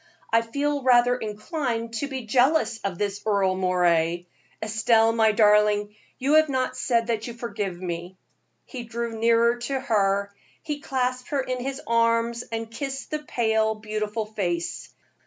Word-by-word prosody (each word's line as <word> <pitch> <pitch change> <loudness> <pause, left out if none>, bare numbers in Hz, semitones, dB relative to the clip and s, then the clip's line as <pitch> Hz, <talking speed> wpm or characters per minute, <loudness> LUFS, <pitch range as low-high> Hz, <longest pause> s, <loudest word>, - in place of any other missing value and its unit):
"I 230 - +5
feel 285 +5 -1
rather 245 -1 +4
inclined 230 +1 -3
to 285 - -2
be 265 -3 -5
jealous 250 +1 +2
of 195 -4 -4
this 205 0 -2
Earle 200 -3 +2
Moray. 175 -2 +1 0.3
Estelle, 220 +1 +3
my 220 -1 +4
darling, 210 -1 +3 0.2
you 275 +3 +1
have 315 -1 +4
not 260 -1 -1
said 235 -2 +1
that 225 -1 -2
you 235 - -7
forgive 205 -6 -4
me." 175 0 -5 0.5
He 255 - -7
drew 235 0 -4
nearer 235 +1 +3
to 265 +3 -3
her, 200 -5 +1 0.3
he 295 -2 -4
clasped 255 -3 -2
her 285 -3 0
in 255 -1 -3
his 270 +2 -4
arms, 230 0 +1
and 225 0 -4
kissed 270 +3 -5
the 305 - -1
pale, 220 -6 0
beautiful 215 0 -3
face. 180 -6 -3
230 Hz, 155 wpm, -25 LUFS, 210-250 Hz, 0.5 s, I